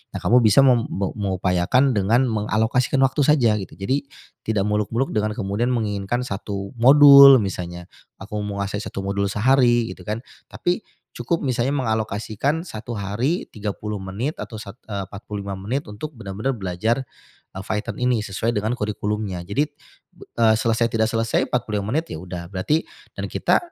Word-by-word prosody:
Nah, - - -2
kamu 120 +8 +5
bisa 110 +5 +6
mem 125 -4 +4
me 95 0 -2
mengupayakan 95 +6 +1
dengan 110 +4 +2
mengalokasikan 110 +4 +1
waktu 135 +3 +1
saja 135 -7 +4
gitu, 95 - -8
jadi 130 +9 -1 0.5
tidak 105 -3 +1
muluk-muluk 105 +5 0
dengan 105 0 0
kemudian 105 +2 -1
menginginkan 110 +1 -1
1 100 -2 -5
modul 140 +1 +9
misalnya, 90 -3 -5 0.4
aku 105 +2 -6
menguasai 100 -1 -3
1 100 - -5
modul 100 +1 -1
sehari 120 +2 +3
gitu, - - -11
kan. 110 +2 -3 0.3
Tapi 175 0 -1 0.3
cukup 170 -2 -2
misalnya 130 +1 0
mengalokasikan 110 +4 -1
1 120 -7 -7
hari, 110 - -2
30 105 0 -4
menit 100 +11 -4
atau 110 - -7
sat 100 +2 -10
eee, 100 -2 -4
45 100 -1 -6
menit 125 +9 -3
untuk 150 +9 -7
benar-benar 110 +4 -3
belajar 105 +6 -1 0.5
Python 105 +3 -4
ini 125 -3 +1
sesuai 105 +4 -2
dengan 110 +3 0
kurikulumnya. 105 -3 -3
Jadi, 120 +12 0 0.7
eee, 110 -1 +5
selesai 115 +1 +1
tidak 110 0 +2
selesai, 115 0 0
45 105 -4 -2
menit, 165 +1 +1
ya, - - -5
udah, 90 -1 -7
berarti 150 - 0 0.3
dan - - -3
kita - - +2
110 Hz, 150 wpm, -22 LUFS, 100-125 Hz, 0.7 s, modul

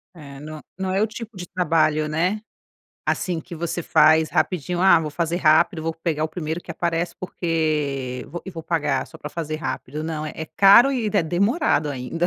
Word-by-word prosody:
É 140 -4 -11
não, 155 +1 -8 0.2
não 190 -1 -2
é 190 +2 +1
o 220 - +2
tipo 225 -1 -9
de 175 -1 -7
trabalho, 155 -4 +1
né. 180 +7 0 0.7
Assim 175 -3 -1
que 170 +2 -10
você 170 +1 -3
faz 155 -1 +4
rapidinho: 175 0 0
"Ah, 185 -2 +6
vou 155 -2 -4
fazer 170 +2 -1
rápido 165 +1 +3
vou 165 0 -2
pegar 160 -2 -2
o - - -2
primeiro 160 0 -4
que 175 - -11
aparece, 170 0 -2
porque 150 -8 -2
vou 175 - -7
e 190 - -6
vou 165 -3 -8
pagar, 150 -5 0
só - - -13
para 150 - -8
fazer 155 -2 -4
rápido", 150 -1 -5
não 155 -1 -3
é - - -6
é 160 - -5
caro 200 - +6
e 240 -4 -1
é 205 -3 +2
demorado 180 - +1
ainda. 140 +6 -2
165 Hz, 200 wpm, -23 LUFS, 155-180 Hz, 0.7 s, Ah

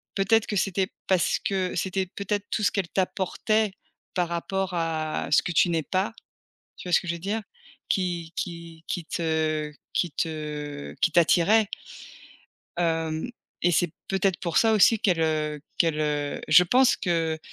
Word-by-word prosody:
peut-être 210 +3 +3
que 205 - -2
c'était 190 0 +1 0.2
parce 185 -2 +2
que 190 -2 -1
c'était 190 +2 -1
peut-être 200 +2 -3
tout 215 - -1
ce 200 - +3
qu'elle 195 -4 -1
t'apportait 195 +2 0 0.4
par 175 -2 +1
rapport 190 +2 -2
à 160 -2 -2
ce - - +5
que - - -3
tu 175 - +4
n'es 165 -2 0
pas. 190 +8 -1 0.6
Tu - - -9
vois 175 - -3
ce - - +6
que 180 - -9
je 170 - 0
veux 170 - -6
dire? 205 +5 -2 0.5
Qui 175 -3 -1
qui 170 -2 -6
qui 175 - -3
te 155 -2 -1 0.2
qui 175 -4 0
te 150 -2 -4
qui 170 - +2
t'attirait 185 +6 +4 1.1
hem, 165 0 -1 0.3
et 175 - +3
c'est 175 0 +2 0.2
peut-être 195 -1 0
pour 170 -3 -3
ça 225 -1 +4
aussi 220 +1 +5
qu'elle, 180 -7 +2
heu, 155 -2 0 0.2
qu'elle, 160 -2 +2
heu 145 -1 -1
je 160 +4 +8
pense 250 +7 +4
que 165 -2 0
175 Hz, 165 wpm, -26 LUFS, 160-195 Hz, 1.1 s, je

